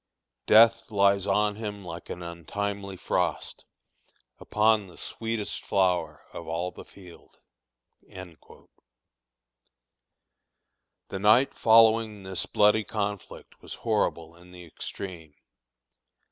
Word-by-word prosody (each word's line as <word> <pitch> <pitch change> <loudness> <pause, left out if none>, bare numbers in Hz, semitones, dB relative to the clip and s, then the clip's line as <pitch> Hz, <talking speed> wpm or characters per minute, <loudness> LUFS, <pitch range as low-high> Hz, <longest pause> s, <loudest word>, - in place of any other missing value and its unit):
"Death 115 +1 +5
lies 100 -2 +2
on 105 0 +1
him 105 -3 -6
like 85 0 -9
an 90 - -6
untimely 100 +3 -5
frost - - -2 0.7
Upon 105 -1 +2
the 90 - -16
sweetest 115 -2 -5
flower 90 -6 0
of - - -8
all 85 +3 -3
the - - -11
field." 90 -3 -17 0.7
The 90 -4 -11 2.8
night 110 +7 +4
following 110 -2 +4
this 95 -1 -3
bloody 105 +1 +3
conflict 105 -2 -6
was - - -9
horrible 85 -7 -2
in 90 +1 -18
the 90 -1 -12
extreme. 85 -2 -8
100 Hz, 100 wpm, -27 LUFS, 90-105 Hz, 2.8 s, Death